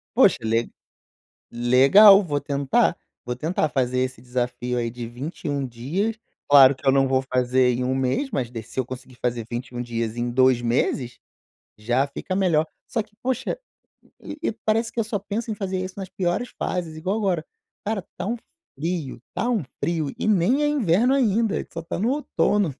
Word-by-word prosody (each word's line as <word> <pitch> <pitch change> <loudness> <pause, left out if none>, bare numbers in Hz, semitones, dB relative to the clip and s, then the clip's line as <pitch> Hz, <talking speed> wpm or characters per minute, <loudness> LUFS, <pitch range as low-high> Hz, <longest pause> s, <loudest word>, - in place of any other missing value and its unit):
Poxa, - - +5
le 115 +1 0 0.8
legal, 135 - +7
vou 145 -4 -1
tentar, 140 -1 +1 0.3
vou 125 0 -3
tentar 155 +3 0
fazer 130 -3 0
esse 130 -2 -3
desafio 125 0 -2
aí 115 -1 -1
de 120 0 -6
21, 140 +3 -4
dias. 165 - -2 0.3
Claro 140 -1 +8
que 135 - -14
eu - - +8
não 135 0 +4
vou 130 0 +2
fazer 125 -1 +2
em 125 +1 -2
1 130 +1 0
mês, 135 - 0
mas 125 - -2
de 115 -2 -6
se 115 +4 -4
eu 130 - -3
conseguir 130 0 -9
fazer 120 -2 -2
21, 120 0 -4
dias 115 -2 -3
em 120 0 -1
2 130 0 +3
meses 120 +1 0 0.6
já 120 +6 +1
fica 165 +6 -5
melhor 165 -5 +2 0.2
só 225 - -1
que, 210 0 -26
poxa, 260 - -1 0.6
e 300 - -7
e - - 0
parece 225 +2 +1
que 235 - -1
eu 225 - +1
só 215 -1 -2
penso 210 +4 -4
em 215 - -1
fazer 190 -2 -3
isso 185 0 -5
nas 190 -1 -5
piores 185 +7 -2
fases, 170 -4 -3
igual 185 +6 -2
agora: 185 -7 0 0.4
cara, 215 -1 -1
está 180 +1 -8
um 235 +3 -1 0.4
frio, 160 -5 -3
está 240 - -2
um 225 -6 +1 0.2
frio 160 -4 -1
e - - -2
nem 215 - +3
é - - +3
inverno 245 - +3
ainda, 225 -4 +2
a - - +1
gente - - -8
só 165 - -4
está 165 - -5
no 220 +6 +1
outono. 210 - +1
145 Hz, 190 wpm, -24 LUFS, 125-200 Hz, 0.8 s, Claro